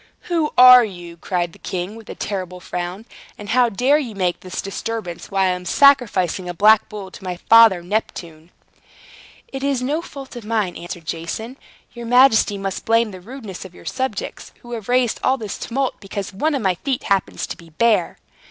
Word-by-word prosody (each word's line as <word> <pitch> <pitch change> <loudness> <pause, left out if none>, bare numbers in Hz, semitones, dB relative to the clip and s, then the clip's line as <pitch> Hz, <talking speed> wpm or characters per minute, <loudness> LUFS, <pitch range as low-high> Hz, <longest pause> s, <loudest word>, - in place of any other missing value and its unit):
"Who 330 -4 -1
are 250 0 +10
you?" 175 -5 -8
cried 175 -1 -3
the - - -17
king, 185 +3 -4
with 225 -1 -13
a - - -6
terrible 185 -3 -5
frown. 180 +4 -5 0.3
"And 205 0 -9
how 245 +1 +3
dare 255 +8 +2
you 240 -8 -5
make 180 -2 -1
this 185 0 -7
disturbance, 195 -2 -5
while 195 -1 +1
I - - +2
am 180 0 -2
sacrificing 190 - +3
a 175 - -5
black 215 +4 +5
bull 200 -3 -8
to - - -13
my 180 -1 -4
father 225 -3 +6
Neptune?" 170 -5 -4 1.0
"It 270 0 -6
is 275 -3 0
no 295 +6 -1
fault 275 -5 -10
of 240 - -7
mine," 210 -4 -1
answered 175 -1 -8
Jason. 170 +10 -5 0.4
"Your 235 -1 -8
majesty 245 -4 +5
must 195 -1 -4
blame 230 -1 +2
the 185 -1 -10
rudeness 220 -3 -9
of 185 -2 -12
your - - -15
subjects, 260 -6 -4
who 240 - -11
have 225 -3 -6
raised 250 -2 +2
all 265 - +2
this 215 -5 -6
tumult 265 +2 -2
because 195 -1 -6
one 300 +10 0
of 265 - -2
my 190 -2 +2
feet 270 -3 -1
happens 195 -2 0
to - - -6
be 170 -1 -16
bare." 225 +7 +1
210 Hz, 195 wpm, -20 LUFS, 180-245 Hz, 1.0 s, are